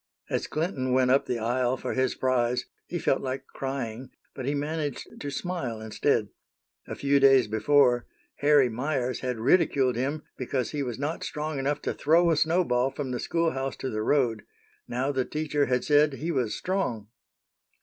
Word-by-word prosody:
As - - -1
Clinton 145 -6 -1
went 130 -1 +3
up 135 - +3
the 125 - -1
aisle 120 +3 0
for - - -4
his 130 0 0
prize, 125 -1 +1 0.2
he 175 - -3
felt 135 - +1
like 130 0 -4
crying, 130 -2 -5 0.2
but 130 -1 -6
he 145 - 0
managed 150 -1 -3
to 145 - -3
smile 140 -7 -3
instead. 110 0 0 0.6
A - - -5
few 140 0 +2
days 135 -3 +6
before, 120 +3 +3 0.3
Harry 145 -2 +5
Meyers 125 +1 -2
had 125 -2 -3
ridiculed 130 0 +3
him 140 +5 -2
because 130 -1 -2
he 150 - -2
was 125 -4 -3
not 145 +4 -3
strong 150 -1 -3
enough 145 +2 -1
to - - -1
throw 170 +3 +3
a - - +3
snowball 155 -6 +2
from 135 -1 -5
the 125 - -2
schoolhouse 135 -6 -1
to 130 - -4
the 110 - -2
road; 120 -3 +1 0.5
now 130 +4 -1
the 130 -2 0
teacher 150 0 -1
had 125 -1 +1
said 150 0 +4
he 160 +5 -3
was 125 -8 0
strong! 125 - -2
135 Hz, 175 wpm, -27 LUFS, 125-150 Hz, 0.6 s, days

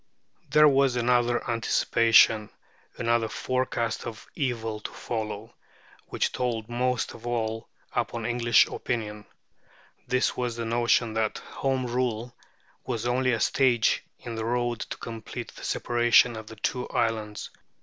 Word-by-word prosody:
There 150 +2 +7
was 135 -2 +3
another 120 0 +2
anticipation, 115 -1 +4 0.5
another 115 -1 +1
forecast 125 -3 -2
of 110 -2 -8
evils 115 -5 -2
to - - -4
follow, 110 -1 -5 0.5
which - - -1
told 115 -3 -2
most 125 +1 -1
of 120 - -10
all 115 -2 -2 0.2
upon 115 -1 -2
English 120 -1 +4
opinion. 105 -3 -4 0.8
This 125 0 +1
was 125 -2 -2
the 115 0 -3
notion 120 0 +2
that 110 -1 0
Home 135 -1 -2
Rule 120 -1 -2 0.5
was 120 -3 -3
only 130 +1 +2
a 115 - 0
stage 120 -1 +2
in 120 - -7
the 110 0 -3
road 120 0 0
to - - -6
the - - -4
complete 115 -2 -7
separation 120 0 +3
of 110 -1 -8
the 110 - -10
two 125 +3 -2
islands. 110 -2 -2
120 Hz, 135 wpm, -27 LUFS, 110-125 Hz, 0.8 s, There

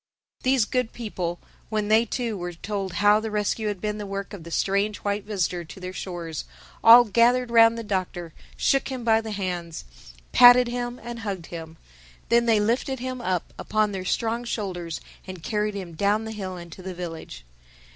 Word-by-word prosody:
These 255 -3 +3
good 250 0 -1
people, 180 -7 -4 0.3
when 215 -1 -1
they 220 +2 +4
too 235 -1 -2
were 175 -2 -5
told 195 +1 -4
how 205 +1 +4
the 220 0 -4
rescue 210 +1 -1
had 205 -3 -2
been 210 +2 -3
the 205 - -5
work 195 +1 -5
of 190 -5 -8
the 170 - -9
strange 200 +4 0
white 205 0 -2
visitor 185 -4 -1
to 170 +4 -11
their 185 0 -6
shores, 170 -5 -5 0.4
all 235 +2 +10
gathered 240 +3 +3
round 230 0 +6
the 230 - -4
Doctor, 180 -5 -3 0.2
shook 275 -1 +2
him 260 -2 -5
by 225 -1 +4
the 220 - -7
hands, 180 -5 -4 0.5
patted 245 0 +8
him 245 0 -4
and 235 0 -6
hugged 195 -6 -4
him. 165 -1 -8 0.5
Then 235 0 +4
they 225 -2 +4
lifted 240 +5 0
him 255 0 -5
up 185 -5 -2
upon 215 -1 +1
their 190 -2 -4
strong 230 +5 -1
shoulders 185 -8 -4 0.3
and 185 -3 -8
carried 210 +3 -1
him 185 -4 -6
down 205 +6 +1
the 220 - -5
hill 190 -4 -5
into 170 +1 -10
the 185 0 -6
village. 165 - -7
210 Hz, 185 wpm, -25 LUFS, 185-230 Hz, 0.5 s, all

